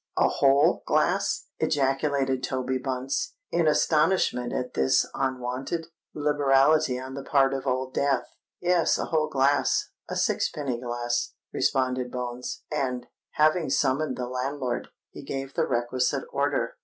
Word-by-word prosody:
a - - +5
whole 140 +1 +3
glass?" - - +1
ejaculated 135 -1 +1
Toby 130 0 -2
Bunce, 130 +1 -2 0.2
in 170 -2 +2
astonishment 150 -5 +2
at 125 - -3
this 65 0 +3
unwonted 130 +5 -2 0.3
liberality 145 -1 +3
on 130 +1 -7
the 140 - -5
part 135 -1 +3
of 135 0 -4
Old 130 0 -1
Death. 140 -1 +1 0.3
"Yes—a 175 -1 +2
whole 155 -1 0
glass—a 140 0 0
sixpenny 130 -5 -1
glass," 120 0 -2 0.2
responded 130 -1 0
Bones; 125 0 -5
and, 125 -4 -1 0.3
having 155 0 +3
summoned 140 +3 +1
the 125 - -2
landlord, 130 0 -3 0.2
he - - -9
gave 135 0 -5
the - - 0
requisite 120 +1 0
order. - - -1
135 Hz, 125 wpm, -26 LUFS, 125-145 Hz, 0.3 s, a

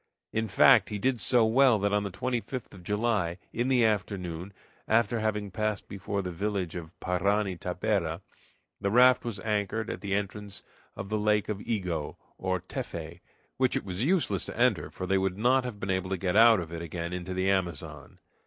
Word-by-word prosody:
In 110 0 0
fact, - - +6
he 105 - -3
did 125 +1 0
so 120 -3 +4
well 125 +1 +5
that 100 0 0
on 105 - +3
the 100 - -3
25th 125 +4 -4
of 95 - -12
July, 105 -3 0 0.2
in 120 +2 0
the 125 -3 +4
afternoon, 95 -4 -2 0.4
after 115 +1 +2
having 105 -2 -1
passed 110 +1 -2
before 100 0 -3
the 90 - -4
village 95 -1 -2
of 85 -1 -8
Parani 95 +2 0
Tapera, 90 -2 -1 0.6
the 100 - 0
raft 125 +3 +6
was 115 -5 -4
anchored 105 +1 -1
at - - -6
the 100 -1 -1
entrance 100 0 -4 0.3
of 100 - -6
the 110 0 0
Lake 105 0 +1
of 105 -2 -3
Ego, 90 -9 -3 0.2
or 95 0 -1
Teffe, 85 +1 -6 0.4
which 130 -1 +2
it - - -2
was 95 +3 -2
useless 145 - +1
to - - -7
enter, - - +2
for 90 - -6
they 95 +1 +2
would 95 -1 -1
not 125 +4 +3
have 115 -5 -6
been 95 -1 -2
able 95 0 -1
to 95 - -1
get 90 0 -1
out 115 -1 +7
of 85 -1 -6
it 85 - -5
again 85 +1 -5
into 90 +1 -4
the 95 +1 0
Amazon. 90 -6 -3
100 Hz, 195 wpm, -28 LUFS, 90-110 Hz, 0.6 s, out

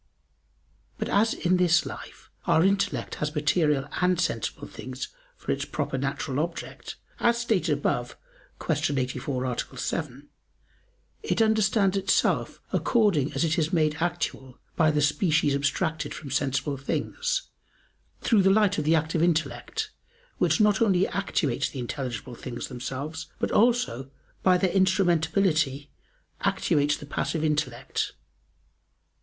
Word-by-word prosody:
But - - -3
as 220 +3 +3
in 180 0 +2
this 175 -2 +4
life - - -9 0.2
our 160 - +4
intellect 195 +1 +1
has 150 +1 -2
material 150 -2 +2
and 180 -1 +3
sensible - - -2
things - - -7 0.3
for - - -4
its - - -1
proper - - -3
natural - - -2
object, - - -5 0.2
as 235 0 +3
stated 230 -8 +1
above 125 -4 -1 0.4
(Q. 145 - 0
84, 130 0 -2
A. 125 +1 -3
7), 145 0 -4 0.9
it 435 - -1
understands 215 -3 +3
itself 195 0 +1
according 200 - +2
as - - 0
it 165 +2 +1
is 155 0 0
made 155 -3 +2
actual 165 -6 -2 0.2
by 160 -2 +4
the 150 -1 +2
species 150 -1 +2
abstracted 155 +2 -1
from 140 -3 -8
sensible 135 +1 0
things, 485 - -1 0.8
through 220 -4 +4
the 190 - +4
light 205 -2 +3
of 150 - -2
the 160 +2 +4
active 160 +1 0
intellect, 175 - 0 0.5
which - - +3
not 210 -1 +4
only 190 -4 +3
actuates 145 -8 -1
the - - -9
intelligible 125 -1 -4
things 120 0 -6
themselves, 140 +6 -5
but - - -1
also, 230 - +2 0.3
by 185 -1 +5
their 185 -1 +1
instrumentality, 170 -6 +2 0.5
actuates 145 0 +1
the - - -10
passive 155 +2 -2
intellect. 135 -5 -1
160 Hz, 130 wpm, -26 LUFS, 140-195 Hz, 0.9 s, by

